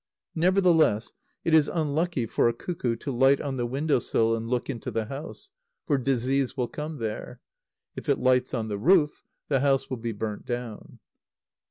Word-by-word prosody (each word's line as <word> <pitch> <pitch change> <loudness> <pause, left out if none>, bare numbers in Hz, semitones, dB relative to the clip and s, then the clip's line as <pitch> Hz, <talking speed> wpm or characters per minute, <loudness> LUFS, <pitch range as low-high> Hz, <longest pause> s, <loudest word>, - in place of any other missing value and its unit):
Nevertheless, 170 - +3 0.3
it 165 - 0
is 155 -2 +6
unlucky 160 -3 -1
for 115 - +2
a - - -1
cuckoo 125 -5 -2
to 140 +5 -5
light 135 +2 +4
on 135 -2 -3
the 120 -1 -1
window 140 +3 +1
sill 115 -1 +1
and 115 0 -4
look 125 0 -1
into 120 -5 -4
the 110 -1 -2
house; 145 - -8 0.3
for 145 -3 +1
disease 130 +1 0
will 125 -2 0
come 155 +1 -5
there. 110 -4 -5 0.6
If - - -6
it - - +3
lights 125 0 +2
on 110 -2 -2
the 100 -2 -3
roof, 150 - +3 0.2
the 135 -2 +2
house 135 0 +1
will 130 - -2
be 115 0 -3
burnt 105 0 -5
down. 120 -3 -5
130 Hz, 180 wpm, -26 LUFS, 115-150 Hz, 0.6 s, is